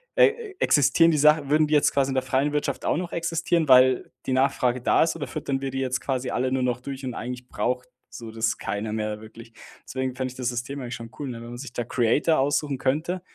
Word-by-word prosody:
äh, 445 -2 +2
existieren 160 - +4
die 155 - +1
Sachen 150 0 +4
würden 155 0 +4
die 150 - +2
jetzt 150 - +3
quasi 140 -1 +2
in 135 - -2
der 130 - +1
freien 135 +3 0
Wirtschaft 150 - -2
auch - - +1
noch 175 0 -4
existieren, 170 -1 0
weil 130 0 +5
die 130 - -1
Nachfrage 130 -2 +1
da - - +4
ist 165 - -1
oder 155 -3 -5
füttern 140 -3 -3
wir 135 - -2
die 135 0 -4
jetzt 130 -1 -1
quasi 130 -2 -2
alle 130 +1 0
nur 130 -1 0
noch 125 -1 -1
durch 135 0 -6
und 125 - -3
eigentlich 125 +2 -6
braucht 125 +1 -2 0.2
so 115 -2 -9
das 110 0 -1
keiner 105 +2 -4
mehr 105 -1 -3
wirklich.“ 115 +1 -13 0.3
Deswegen 130 -1 -3
fände 130 0 -3
ich 125 - -14
das 125 -1 -1
System 125 +3 -4
eigentlich 125 -1 -5
schon 115 -1 -9
cool, 145 -2 -4
ne, 120 -2 -6
wenn 115 0 -9
man 120 - -7
sich 130 -2 -8
da 120 - -2
Creator 125 +7 +2
aussuchen 140 0 0
könnte, 160 +8 -1
130 Hz, 245 wpm, -25 LUFS, 125-150 Hz, 0.3 s, weil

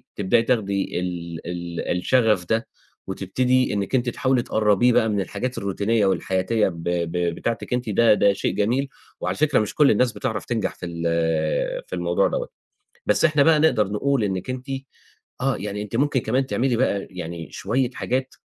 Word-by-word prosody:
تبدئي 100 +3 +2
تاخدي 100 -7 0
ال 85 -2 -4
ال 85 0 -3
الشغف 105 -2 +2
ده، 115 +1 0 0.4
وتبتدي 125 +7 +1
إنِّك 100 +5 -1
أنتِ 125 -1 +1
تحاولي 130 +1 +1
تقربيه 110 +3 +3
بقى 110 - +3
من 105 -2 0
الحاجات 125 +7 -4
الروتينية 100 +2 0
والحياتية 95 +3 +1
ب 85 -3 -6
ب 85 -1 -1 0.2
بتاعتِك، 115 +4 -3
أنتِ 125 -2 -1
ده 115 +2 +5
ده 100 -1 +4
شيء - - -2
جميل، 125 +7 +1 0.3
وعلى - - -2
فكرة 155 0 +3
مش 110 -1 -2
كل 150 -2 +5
الناس 120 +3 +2
بتعرف - - -3
تنجح - - -2
في - - -8
ال 85 -1 -5 0.8
في - - -5
الموضوع - - +1
دَوّة. - - -3 0.6
بس - - +2
إحنا 155 -3 +4
بقى 155 +1 +5
نقدر 110 -10 +3
نقول 135 +2 +1
إنِّك 95 +3 -3
أنتِ 130 0 -5 0.7
آه 135 +1 +1
يعني 105 +1 -4
أنتِ 105 +2 -5
ممكن 140 0 +2
كمان 130 +4 0
تعملي 130 -2 0
بقى 100 -5 0
يعني 85 -2 -7
شوية 120 +5 -1
حاجات 130 +1 -2
110 Hz, 170 wpm, -23 LUFS, 95-130 Hz, 0.8 s, ده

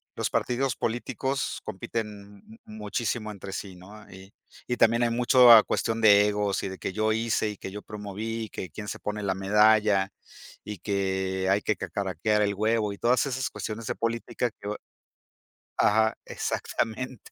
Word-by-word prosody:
los - - -1
partidos 125 0 0
políticos 130 +3 -2
compiten 100 0 -6 0.2
muchísimo 110 +1 -3
entre 100 -1 -8
sí, 95 -1 -6
¿no? 100 +4 -14
Y 95 +1 -13 0.3
y 125 - -2
también 115 +1 +4
hay 120 - +2
mucho, 125 +1 +6
ah, 115 -2 +11
cuestión 115 -1 -1
de 105 -2 +7
egos 105 -1 -1
y - - -2
de 95 - -7
que 95 - -4
yo 110 +1 +1
hice 110 -1 0
y 105 - -7
que 95 - -7
yo 105 +2 -7
promoví, 105 +2 -5
que 90 - -6
quién 105 +6 -8
se - - -4
pone 105 0 -4
la 95 -2 -1
medalla, 105 0 +3 0.5
y 105 -1 -6
que 95 -1 -1
hay 100 +2 +3
que 110 - 0
cacaraquear 95 +3 -1
el 100 -1 +1
huevo 110 0 +1
y - - -10
todas 125 +5 +2
esas 130 -1 -2
cuestiones 110 +2 -6
de - - -2
política 115 +1 -2
que 100 - -8
bue 105 - -3 1.0
Ajá, 110 +1 +3
exactamente. 125 +2 -3
105 Hz, 170 wpm, -27 LUFS, 100-115 Hz, 1.0 s, ah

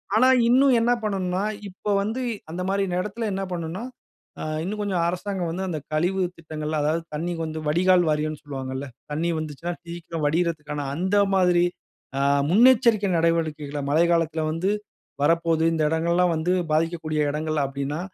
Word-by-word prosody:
ஆனா 255 +4 +5 0.2
இன்னும் 265 +1 +5
என்ன 235 +1 +2
பண்ணணுனா, 190 -2 -1 0.3
இப்ப 185 - -21 0.2
வந்து 225 +5 -2 0.3
அந்தமாரி 190 +3 -1 0.2
இடத்தில 210 +4 -3
என்ன 195 0 -2
பண்ணணுனா, 175 +4 -4 0.6
அ - - -3 0.2
இன்னும் 210 +4 -3
கொஞ்சம் 190 -4 0
அரசாங்கம் 180 -1 -2
வந்து 185 +3 -3
அந்த 155 - -2
கழிவு 180 +5 +1 0.2
திட்டங்கள் 155 -1 -5
அதாவது 155 +3 +1
தண்ணிக்கு 165 +2 -2
வந்து 155 0 -5
வடிகால் 180 +3 +4
வாரியன்னு 150 0 -1
சொல்வாங்கல்ல. 135 -1 -5 0.3
தண்ணீ 160 +3 0
வந்துச்சுனா, 155 +3 -4
சீக்கிரம் 170 -2 -5
வடியிறதுக்கான 150 -3 -1
அந்த 185 +5 0 0.2
மாதிரி 180 -2 +4 0.6
ஆ - - +1 0.3
முன்னெச்சரிக்கை 225 -1 +5
நடவடிக்கைகள, 155 -3 0
மழைக்காலத்தில 165 0 +2
வந்து 165 +5 -1 0.5
வரப்போது 165 0 +2
இந்த 160 - 0
இடங்கள்லாம் 170 +2 +2
வந்து 160 +3 0 0.2
பாதிக்கக்கூடிய 160 -1 0
இடங்கள் 155 0 -1
அப்பிடின்னா, 140 +3 -3
170 Hz, 140 wpm, -24 LUFS, 155-185 Hz, 0.6 s, ஆனா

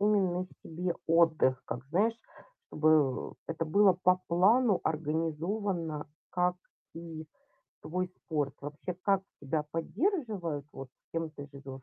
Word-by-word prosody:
именно 190 -3 +2 0.2
себе 175 +2 -2
отдых, 160 -6 +4
как, 120 - -5
знаешь, 215 +7 +2 0.5
чтобы 155 -4 +2
это 165 0 -2
было 195 +5 +5
по 180 0 +3
плану 200 +4 +4
организовано, 160 +1 -1 0.2
как 180 0 +1 0.4
и 165 -1 -7 0.6
твой 180 +2 -2
спорт? 145 -4 -2
Вообще, 145 +5 -5
как 195 -1 +3 0.2
тебя 150 +2 -1
поддерживают, 195 - -1
вот, 135 -1 -8 0.2
кем 165 -1 -2
ты 145 -2 -9
живёшь, 135 -1 -9
165 Hz, 115 wpm, -31 LUFS, 150-185 Hz, 0.6 s, было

